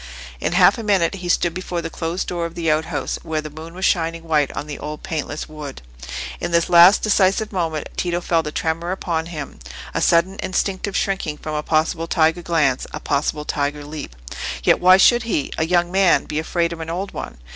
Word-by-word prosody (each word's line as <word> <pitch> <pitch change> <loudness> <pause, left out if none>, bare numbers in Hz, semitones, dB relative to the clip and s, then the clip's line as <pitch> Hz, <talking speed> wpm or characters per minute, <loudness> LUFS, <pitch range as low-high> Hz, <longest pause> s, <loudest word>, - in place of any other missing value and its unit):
In - - -1
half - - +5
a - - -4
minute 195 -5 +2
he 180 -2 -6
stood 175 -1 +2
before 180 -1 -4
the 165 -1 -5
closed 165 +3 -3
door 170 -1 -2
of 165 - -14
the 165 -2 +1
outhouse, 155 0 -1
where 160 -1 -2
the 155 0 -6
moon 160 +3 -10
was 190 +1 -2
shining 165 -2 +1
white 150 -4 +1
on - - -4
the 150 -1 -7
old 150 +1 -6
paintless 155 -1 -4
wood. 150 - -8 0.6
In - - -3
this 170 0 +2
last 175 +3 +8
decisive 205 0 +2
moment, 165 -5 -2
Tito 175 -1 -1
felt 165 -3 0
a - - -3
tremor 165 +2 -2
upon 165 -3 -2
him—a 140 - -7
sudden 175 +3 +3
instinctive 190 +1 -1
shrinking 190 -7 -1
from 155 - -6
a 150 - -1
possible 160 +2 0
tiger 160 0 +2
glance, 155 -7 +1
a 150 - -5
possible 150 +1 -1
tiger 145 0 -2
leap. 145 - -7 0.5
Yet - - +4
why 185 +1 +7
should 240 +5 +5
he, 220 -11 -2
a 160 - +1
young 175 0 +2
man, 190 -2 +4
be 150 - -2
afraid 170 +1 -1
of 165 - -9
an 160 0 -5
old 185 +4 -3
one? - - -6
165 Hz, 205 wpm, -21 LUFS, 155-180 Hz, 0.6 s, last